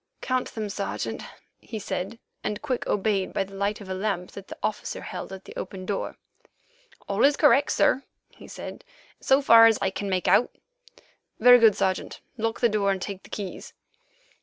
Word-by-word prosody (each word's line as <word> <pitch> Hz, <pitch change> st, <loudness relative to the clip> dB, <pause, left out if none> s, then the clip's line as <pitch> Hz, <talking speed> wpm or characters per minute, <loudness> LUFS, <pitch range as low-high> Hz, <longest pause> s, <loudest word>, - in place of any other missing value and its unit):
"Count 255 Hz, -1 st, -2 dB
them, 215 Hz, -2 st, -3 dB
Sergeant," 200 Hz, 0 st, -4 dB, 0.4 s
he 225 Hz, -, -7 dB
said, 200 Hz, +1 st, -4 dB, 0.3 s
and 210 Hz, +4 st, -3 dB
Quick 260 Hz, -4 st, -2 dB
obeyed 200 Hz, -2 st, 0 dB
by -, -, +1 dB
the 195 Hz, 0 st, -13 dB
light 200 Hz, +2 st, -1 dB
of 200 Hz, -, -10 dB
a 190 Hz, -, -3 dB
lamp 185 Hz, -2 st, -2 dB
that 195 Hz, -1 st, -10 dB
the -, -, -9 dB
officer 215 Hz, -, -3 dB
held -, -, -7 dB
at 190 Hz, 0 st, -9 dB
the -, -, -11 dB
open 185 Hz, 0 st, -6 dB
door. 200 Hz, 0 st, -3 dB, 0.9 s
"All 200 Hz, +2 st, -1 dB
correct, 285 Hz, -1 st, +4 dB
sir," 270 Hz, -, +3 dB, 0.3 s
he -, -, -14 dB
said, -, -, -8 dB, 0.4 s
"so 270 Hz, +1 st, +3 dB
far 230 Hz, -3 st, +8 dB
as 225 Hz, -2 st, +3 dB
I 195 Hz, -1 st, 0 dB
can 200 Hz, +1 st, -4 dB
make 185 Hz, -1 st, -1 dB
out." 245 Hz, -, +5 dB, 0.9 s
"Very 245 Hz, +2 st, +8 dB
good, 225 Hz, -3 st, +6 dB
Sergeant. 185 Hz, -1 st, -1 dB, 0.2 s
Lock 225 Hz, -1 st, -2 dB
the 240 Hz, -, +6 dB
door 205 Hz, -2 st, +1 dB
and 195 Hz, -1 st, 0 dB
take 195 Hz, 0 st, -6 dB
the -, -, -16 dB
keys." 195 Hz, -3 st, -6 dB
205 Hz, 185 wpm, -26 LUFS, 195-230 Hz, 0.9 s, far